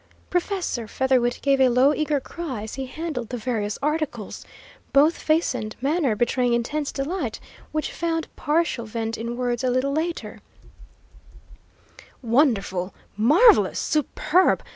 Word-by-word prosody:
Professor 355 - -1
Featherwit 250 -1 +1
gave 275 -1 +3
a 260 - +6
low, 255 +4 +4
eager 300 -1 0
cry 270 -6 -6
as 220 - -7
he 265 -1 -4
handled 300 -6 -5
the 250 - -4
various 215 -3 -2
articles, 300 -8 -2 0.5
both 295 +4 +5
face 315 -1 +1
and 220 -3 -5
manner 280 -3 +1
betraying 240 +2 +1
intense 280 +5 -1
delight, 275 - -3 0.3
which 310 0 -2
found 330 -1 -2
partial 300 -6 0
vent 225 0 -3
in 235 +1 -5
words 245 -1 -1
a 255 - +2
little 255 +3 +1
later. 330 +3 -3 1.8
"Wonderful! 225 - +1 0.2
Marvellous! 310 - +5
Superb! 310 +4 +2
265 Hz, 130 wpm, -24 LUFS, 235-310 Hz, 1.8 s, a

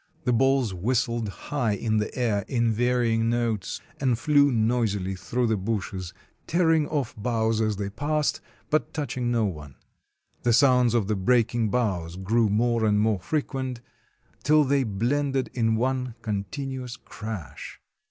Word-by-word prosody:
The 125 - +1
balls 135 -3 +2
whistled 115 +3 0
high 115 - -2
in 110 +2 0
the 105 - -1
air 110 -5 +1
in 120 -3 +1
varying 115 -1 +1
notes, 115 -5 -1 0.2
and 130 -4 +1
flew 145 +1 +4
noisily 110 -5 0
through 120 +6 -2
the 110 -2 +1
bushes, 95 -3 -3 0.4
tearing 160 -3 +3
off 140 -6 -2
boughs 110 0 0
as 110 -1 +1
they 100 0 -4
passed, 150 +5 -1 0.3
but 155 - 0
touch 145 -5 -3
ing 125 -2 -1
no 115 -2 +2
one. 75 -8 -6 0.7
The 120 - +2
sounds 125 -1 +4
of 115 -4 +2
the 105 +2 0
breaking 115 +2 +2
boughs 95 -8 -1
grew 110 +4 +1
more 115 +2 +1
and 105 -1 +3
more 105 -2 +2
frequent, 130 - -3 0.6
till 150 0 +4
they 140 0 +2
blended 130 +5 -1
in 115 -2 +1
one 125 0 -1
con 100 -2 -2
tinuous 130 -4 -5
crash. 105 -8 -7
115 Hz, 150 wpm, -26 LUFS, 105-130 Hz, 0.7 s, flew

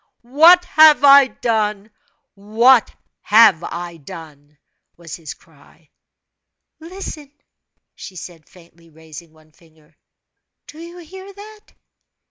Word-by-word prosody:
"What 325 +8 +3
have 310 -5 +3
I 280 -1 +6
done? 215 -2 -5 0.4
what 225 +5 +1 0.3
have 210 -6 +3
I 170 -1 -9
done?" 150 -1 -15 0.4
was 170 -2 -11
his 160 -4 -11
cry. 155 0 -27 0.9
"Listen!" 325 -4 -11 0.6
she 190 - -14
said, 170 -2 -13
faintly 170 -1 -23
raising 160 0 -16
one 155 0 -27
finger. 160 -1 -28 0.7
"Do 305 - -16
you 340 +1 -13
hear 375 +3 -14
that?" 420 +2 -17
210 Hz, 105 wpm, -17 LUFS, -, 0.9 s, I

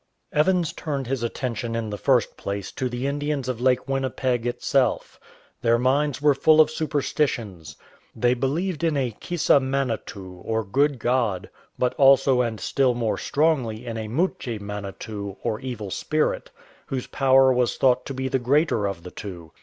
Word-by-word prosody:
Evans 170 +2 +2
turned 140 -4 -3
his 130 0 -2
attention 115 -1 -3
in 110 -2 -3
the - - -2
first 125 +1 +1
place 100 -1 -5
to 130 - -3
the 120 +2 -4
Indians 145 -1 -2
of 125 -2 -3
Lake 130 0 +2
Winnipeg 130 -2 -1
itself. 125 +2 0 0.4
Their 115 0 +3
minds 140 +3 +1
were 145 0 +4
full 155 +3 +4
of 155 0 +6
superstitions. 135 - -2 0.4
They 120 0 +2
believed 155 +8 -1
in 160 -3 +2
a 130 -3 0
Kissa 150 +5 +2
Manetoo 115 -9 -3
or 110 0 -1
Good 140 +7 +1
God, 120 -6 0 0.3
but 125 - +1
also 135 -2 +5
and 115 -3 -2
still 130 -3 +1
more 115 -3 -1
strongly 130 -7 0
in 115 -1 -4
a 110 -1 -4
Muche 130 - -1
Manetoo 100 0 -6
or 110 -2 -1
Evil 120 -7 -6
Spirit, 155 +8 -1 0.4
whose 130 -2 -3
power 135 -1 +4
was 125 -1 +1
thought 125 -2 +3
to 135 - -4
be 130 0 -2
the 130 0 0
greater 125 -4 +2
of 95 -4 -5
the 90 - -9
tv.o. 85 -6 -8
125 Hz, 165 wpm, -24 LUFS, 110-140 Hz, 0.4 s, of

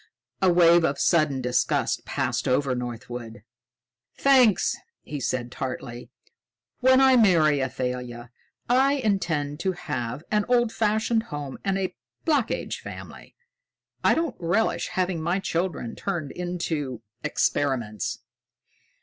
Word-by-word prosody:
A 190 -2 +5
wave 170 -1 +6
of 140 -3 +1
sudden 155 -6 +2
disgust 125 0 0
passed - - -1
over 130 +1 +2
Northwood. 120 -2 -6 0.7
"Thanks," 255 -7 +4 0.3
he 150 - -5
said 120 -2 -2
tartly. 125 -2 -6 0.7
"When 260 +1 +5
I 265 -1 +6
marry 165 - +4
Athalia, 125 -2 -4 0.4
I 265 +3 +4
intend 165 - -1
to 190 +2 0
have 130 -6 -4
an 210 -1 +2
old 240 -2 +3
fashioned 220 +1 +1
home 145 -2 -6
and 195 -1 0
a 190 -1 -2 0.3
Black 290 -8 +2
Age - - -3
family. - - -10 0.7
I - - +4
don't 325 -6 -1
relish 175 +6 0
having 180 -3 -1
my 175 +4 0
children 170 -9 -2
turned 170 -8 -3
into 160 -8 -3 0.2
experiments." 120 -8 -1
165 Hz, 120 wpm, -25 LUFS, 130-205 Hz, 0.7 s, wave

